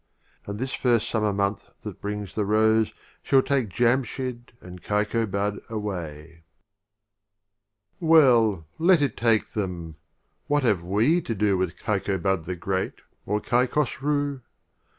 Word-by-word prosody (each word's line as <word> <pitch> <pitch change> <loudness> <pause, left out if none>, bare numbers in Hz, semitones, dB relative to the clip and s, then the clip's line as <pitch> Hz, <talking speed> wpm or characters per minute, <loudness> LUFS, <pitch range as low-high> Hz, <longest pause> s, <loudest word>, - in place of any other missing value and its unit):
And 100 0 -4
this 130 +4 -3
first 120 -4 +1
Summer 105 -2 0
month 100 0 -2
that - - -8
brings 105 -2 -4
the 105 - 0
Rose 110 +1 +3 0.3
Shall 135 -1 +3
take 135 -6 0
Jamshyd 120 +2 -1
and 90 0 -11
Kaikobad 105 -1 -1
away. 85 -8 -5
X. - - -25 1.6
Well, 125 - +4
let 170 -2 +5
it 140 - -1
take 115 -2 +2
them! 85 -6 -4 0.5
What 145 -1 +1
have 105 -8 +2
we 110 - +2
to 115 - -4
do 100 -1 +2
With 90 -2 -2
Kaikobad 95 -3 -1
the 90 - -3
Great, 95 +2 -2 0.3
or 105 +1 +1
Kaik 125 +3 +1
hosrii 145 -1 0
105 Hz, 130 wpm, -25 LUFS, 95-125 Hz, 1.6 s, let